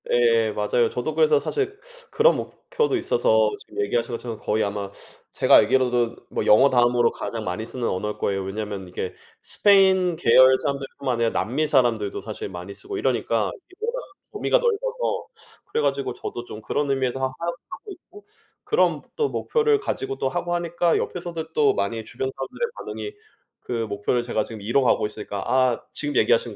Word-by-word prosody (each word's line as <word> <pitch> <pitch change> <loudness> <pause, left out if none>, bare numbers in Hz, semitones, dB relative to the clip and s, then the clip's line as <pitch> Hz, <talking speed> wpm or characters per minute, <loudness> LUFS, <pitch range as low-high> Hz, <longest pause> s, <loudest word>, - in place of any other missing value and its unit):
예. 465 -1 +3
맞아요. 475 -1 +1
저도 450 - -3
그래서 460 -1 +4
사실 410 -2 -2 0.3
그런 470 +2 +4
목표도 465 -5 -2
있어서 110 - +2
지금 - - -6
얘기하신 115 +4 -1
것처럼 115 -1 -6
거의 110 +1 0
아마 100 -1 -3 0.4
제가 - - +5
알기로도 120 0 +3
뭐 - - -2
영어 130 +6 +7
다음으로 120 -1 +3
가장 115 -2 -5
많이 90 +5 -3
쓰는 120 0 -3
언어일 105 +3 -2
거예요. 95 -1 -1
왜냐하면 100 -1 -5
이게 90 +1 -5 0.3
스페인 190 -3 +4
계열 130 -1 +6
사람들 140 -1 -3
뿐만 130 -3 -1
아니라 115 0 +1
남미 140 +8 -1
사람들도 120 -8 +1
사실 110 -1 -6
많이 90 +1 -8
쓰고 395 - -7
이러니까 - - 0
이게 390 -5 -17
워낙 475 +2 -2 0.3
범위가 425 +3 +2
넓어서 - - -1 0.4
그래 - - +1
가지고 140 -3 0
저도 120 - -6
좀 110 - -9
그런 145 +6 -1
의미에서 130 -1 0
하 - - -3
하 - - -7 0.4
하고 400 - -9
있고 385 +2 -14 0.4
그런 445 - +2
또 450 -3 +1
목표를 445 -2 +1
가지고 135 - -3
또 135 - 0
하고 175 +6 -2
하니까 170 0 +1
옆에서도 165 -2 -4
또 150 -2 +4
많이 105 +3 -2
주변 125 +4 -4
사람들의 135 - -3
반응이 415 - -6 0.5
그 115 -2 -3
목표를 105 +4 -1
제가 115 -3 -1
지금 110 -1 -9
이뤄가고 120 +4 +2
있으니까 105 -2 -5
아. 130 -2 +2
지금 145 -1 -2
얘기하신 485 0 +2
130 Hz, 400 characters per minute, -24 LUFS, -, 0.5 s, 영어